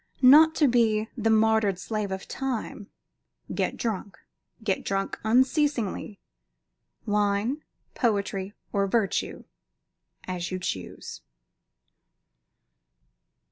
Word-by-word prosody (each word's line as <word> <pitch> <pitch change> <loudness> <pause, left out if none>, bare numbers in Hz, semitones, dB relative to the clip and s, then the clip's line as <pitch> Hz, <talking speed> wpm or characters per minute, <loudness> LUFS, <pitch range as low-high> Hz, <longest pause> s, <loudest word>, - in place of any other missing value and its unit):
Not 310 +5 +8
to 300 - +4
be 225 -3 +2
the 225 -2 0
martyred 220 -3 +3
slave 210 +1 -3
of 190 0 -5
Time, 245 -6 -4 0.7
get - - -1
drunk; 200 -4 -3 0.5
get 200 -4 -1
drunk 195 0 -2
unceasingly. 245 - +1 0.9
Wine, 210 +6 0 0.3
poetry, 200 -4 -1 0.2
or 200 -1 +1
virtue, 200 -2 -1 0.8
as 175 -2 -3
you 185 - -3
choose. 95 - -6
215 Hz, 90 wpm, -26 LUFS, 195-235 Hz, 0.9 s, Not